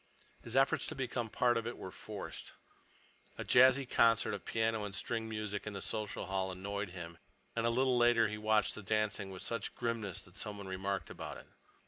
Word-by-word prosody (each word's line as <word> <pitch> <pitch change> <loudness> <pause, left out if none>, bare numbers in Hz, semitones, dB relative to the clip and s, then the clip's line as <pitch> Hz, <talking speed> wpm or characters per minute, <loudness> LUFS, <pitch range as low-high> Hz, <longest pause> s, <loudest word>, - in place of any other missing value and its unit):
His 120 +1 -7
efforts 135 0 +3
to 160 - -1
become 125 -3 -2
a - - -15
part 120 +2 +3
of 115 0 -2
it 120 - -4
were 95 - -7
forced. - - -7 0.8
A - - -4
jazzy 130 +1 +6
concert 115 -3 +4
of 100 - -5
piano 110 -1 +1
and 100 -1 -4
string 110 +2 -2
music 105 -2 -3
in 105 - -3
the 100 - -5
social 105 -2 -2
hall 95 0 -1
annoyed 100 +2 -3
him, 85 -2 -8 0.4
and 115 0 +1
a - - +4
little 125 +1 +3
later 120 -2 +5
he 105 0 -4
watched 110 -1 +3
the - - -7
dancing 105 -1 0
with 95 -1 -7
such 115 - -2
grimness 115 -6 -2
that 90 - -17
someone 105 -2 -4
remarked 95 +1 -2
about - - -6
it. - - -12
110 Hz, 200 wpm, -34 LUFS, 100-115 Hz, 0.8 s, jazzy